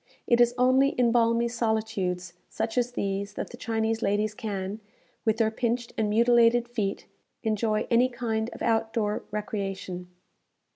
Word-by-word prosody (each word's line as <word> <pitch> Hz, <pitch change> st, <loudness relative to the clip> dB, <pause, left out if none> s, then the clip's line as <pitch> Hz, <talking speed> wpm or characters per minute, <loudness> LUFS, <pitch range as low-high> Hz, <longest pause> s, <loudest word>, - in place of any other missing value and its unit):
It 235 Hz, 0 st, +4 dB
is 240 Hz, 0 st, +4 dB
only 260 Hz, +2 st, +4 dB
in 240 Hz, -2 st, +3 dB
balmy 230 Hz, 0 st, +3 dB
solitudes 220 Hz, -6 st, -1 dB, 0.2 s
such 225 Hz, 0 st, -3 dB
as 245 Hz, -1 st, 0 dB
these 200 Hz, -1 st, -2 dB
that -, -, -5 dB
the -, -, -8 dB
Chinese 225 Hz, -1 st, -1 dB
ladies 210 Hz, +1 st, +1 dB
can, 205 Hz, -1 st, -4 dB, 0.5 s
with 220 Hz, -1 st, +2 dB
their 220 Hz, -1 st, +2 dB
pinched 235 Hz, +1 st, -2 dB
and 215 Hz, -2 st, 0 dB
mutilated 235 Hz, +1 st, +4 dB
feet, 215 Hz, -5 st, -3 dB, 0.4 s
enjoy 215 Hz, -1 st, 0 dB
any 245 Hz, +2 st, +4 dB
kind 230 Hz, -2 st, -2 dB
of -, -, -7 dB
out 225 Hz, -1 st, +1 dB
door 210 Hz, -2 st, 0 dB
recreation. 195 Hz, -4 st, -4 dB
225 Hz, 150 wpm, -27 LUFS, 210-235 Hz, 0.5 s, It